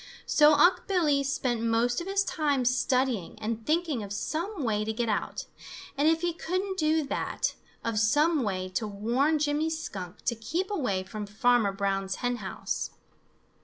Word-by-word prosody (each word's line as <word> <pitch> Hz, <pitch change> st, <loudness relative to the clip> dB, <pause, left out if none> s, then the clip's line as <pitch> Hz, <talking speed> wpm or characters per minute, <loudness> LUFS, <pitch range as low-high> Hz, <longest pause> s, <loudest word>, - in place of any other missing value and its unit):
So 300 Hz, 0 st, +6 dB
Unc' 355 Hz, +4 st, +4 dB
Billy 310 Hz, -8 st, +2 dB
spent 255 Hz, -4 st, -1 dB
most 230 Hz, +4 st, +1 dB
of 345 Hz, -, -6 dB
his 395 Hz, 0 st, +2 dB
time 290 Hz, -8 st, 0 dB
studying 250 Hz, -5 st, +1 dB
and 225 Hz, +1 st, -3 dB
thinking 315 Hz, -5 st, +1 dB
of 200 Hz, -1 st, -7 dB
some 320 Hz, -, -3 dB
way 215 Hz, -3 st, 0 dB
to 220 Hz, -, -2 dB
get 230 Hz, +1 st, -1 dB
out, 210 Hz, -, -2 dB, 0.5 s
and 285 Hz, +2 st, +2 dB
if 325 Hz, 0 st, +3 dB
he 350 Hz, -1 st, 0 dB
couldn't 375 Hz, +3 st, -2 dB
do 310 Hz, 0 st, +2 dB
that, 275 Hz, -, -2 dB, 0.3 s
of 230 Hz, -2 st, 0 dB
some 295 Hz, +8 st, +3 dB
way 185 Hz, -5 st, -2 dB
to 190 Hz, +4 st, -2 dB
warn 240 Hz, +10 st, +1 dB
Jimmy 300 Hz, +1 st, +1 dB
Skunk 200 Hz, -, -6 dB
to 240 Hz, -, +2 dB
keep 320 Hz, -, -3 dB
away 225 Hz, -, 0 dB
from 205 Hz, +2 st, -6 dB
Farmer 220 Hz, 0 st, +3 dB
Brown's 195 Hz, -1 st, -1 dB
hen 245 Hz, 0 st, -1 dB
house. 195 Hz, -4 st, -4 dB
250 Hz, 165 wpm, -28 LUFS, 215-315 Hz, 0.5 s, So